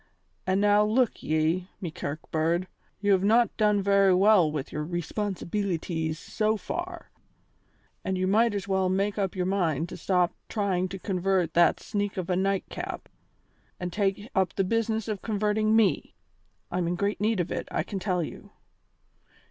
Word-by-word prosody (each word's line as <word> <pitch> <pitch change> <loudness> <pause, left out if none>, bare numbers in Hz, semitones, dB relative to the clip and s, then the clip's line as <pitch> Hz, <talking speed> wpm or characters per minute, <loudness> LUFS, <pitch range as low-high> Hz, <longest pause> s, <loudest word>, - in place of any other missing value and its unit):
And 190 +1 +2
now 205 0 +5
look 225 +3 +1
ye, 160 +4 0
me 175 -5 -4
kirk 150 0 -5
bird, 165 +3 +1 0.3
you 205 -1 +2
have 190 -1 +4
not 230 +3 +3
done 210 -2 +2
very 195 -1 +4
well 190 -4 +5
with 145 -3 -4
your 150 - -3
'responsibeelities' 175 -2 -2
so 215 +4 -1
far, 345 - -6 0.9
and 190 -1 -1
you 185 - 0
might 215 +3 +3
as 200 -1 -3
well 190 -1 +1
make 200 +2 0
up 195 -2 -1
your 180 -1 -1
mind 170 -5 0
to - - -7
stop 180 -2 +1 0.2
trying 190 -4 0
to 195 - -5
convert 185 -3 0
that 170 0 +4
sneak 205 -2 -3
of 185 -1 -2
a - - +2
Nightcap 195 +1 -2 0.7
and 180 -1 -4
take 200 0 0
up 190 -3 +1
the 195 - +2
business 225 +2 0
of 210 -3 -3
converting 215 0 +1
me. 220 -3 +2 0.6
I'm 180 -1 0
in 175 - 0
great 200 +3 -1
need 215 -1 +1
of 175 - -1
it, - - -3
I 155 - -1
can 195 +2 -5
tell 180 -3 0
you." - - -9
195 Hz, 170 wpm, -27 LUFS, 175-210 Hz, 0.9 s, now